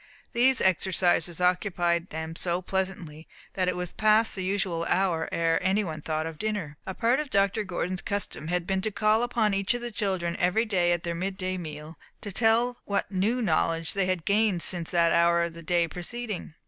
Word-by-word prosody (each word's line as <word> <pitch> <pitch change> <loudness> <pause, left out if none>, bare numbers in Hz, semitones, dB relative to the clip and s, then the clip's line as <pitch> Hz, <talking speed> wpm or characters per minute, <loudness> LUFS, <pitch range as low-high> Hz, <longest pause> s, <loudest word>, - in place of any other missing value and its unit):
These 255 +2 +3
exercises 180 -2 +2
occupied 180 -1 +1
them 160 +1 -5
so 175 +1 0
pleasantly 185 -5 -3 0.3
that 185 -1 0
it 180 - 0
was 180 -1 -4
past 215 +1 +3
the 190 - -4
usual 185 -3 -1
hour 175 -4 +1
ere 165 -1 +1
any 190 +3 +2
one 155 -4 -5
thought 155 +1 -2
of 160 -1 -7
dinner. 205 -9 -3
A 190 - -4
part 245 +3 +2
of 300 -2 -3
Dr. 200 -1 +2
Gordon's 185 -1 -3
custom 200 -6 -4
had 175 0 -1
been 190 0 0
to 220 - -1
call 215 +2 +2
upon 235 -4 +1
each 195 +4 +1
of 240 - -4
his 240 - -4
children 185 -5 -1
every 180 +6 +2
day 180 -5 +1
at 175 -1 0
their 170 - -2
midday 185 +1 -3
meal, 155 -2 -8 0.2
to 205 - -6
tell 235 +4 +2
what 200 -1 -1
"new 215 +6 0
knowledge" 165 -3 +1
they 195 -2 0
had 185 -3 -1
gained 200 -4 +2
since 170 -2 -2
that 170 -1 +3
hour 170 0 +4
of 170 -1 -3
the 170 - -10
day 170 0 +1
preceding. 190 0 -6
185 Hz, 200 wpm, -27 LUFS, 170-205 Hz, 0.3 s, hour